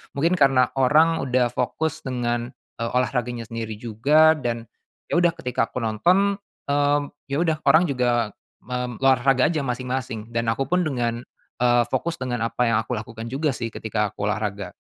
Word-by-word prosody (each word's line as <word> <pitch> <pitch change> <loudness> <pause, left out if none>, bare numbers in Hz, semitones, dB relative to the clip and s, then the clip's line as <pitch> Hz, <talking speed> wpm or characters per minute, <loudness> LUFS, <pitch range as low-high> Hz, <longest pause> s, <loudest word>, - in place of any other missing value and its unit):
Mungkin 165 +6 +2
karena 135 -3 +4
orang 155 +5 +4
udah 125 -1 +2
fokus 155 +6 -2
dengan, 120 -2 -1 0.3
eee, 115 - -1
olahraganya 125 -2 -1
sendiri 115 -1 -4
juga 140 +9 +3
dan 120 -3 -2 0.5
ya 175 - +3
udah 175 -1 +3
ketika 125 -7 -1
aku 125 - -5
nonton, 185 - +2 0.3
mmm, 145 0 +2 0.2
ya 140 0 -2
udah 160 -2 +1
orang 160 +3 +6
juga 120 -4 +1 0.3
mem 125 -1 -4
olahraga 135 +2 +4
aja 160 - -1
masing-masing. 125 -3 -4
Dan 115 0 -1
akupun 135 +10 +1
dengan, 120 -4 -1 0.4
eee, 120 0 +4
fokus 170 0 -1
dengan 120 -3 -1
apa 120 +1 0
yang 110 - +3
aku 120 - -5
lakukan 110 +1 -7
juga 145 +4 0
sih 115 0 -4
ketika 105 -1 -2
aku - - -6
olahraga. 105 -1 -3
125 Hz, 160 wpm, -23 LUFS, 115-145 Hz, 0.5 s, orang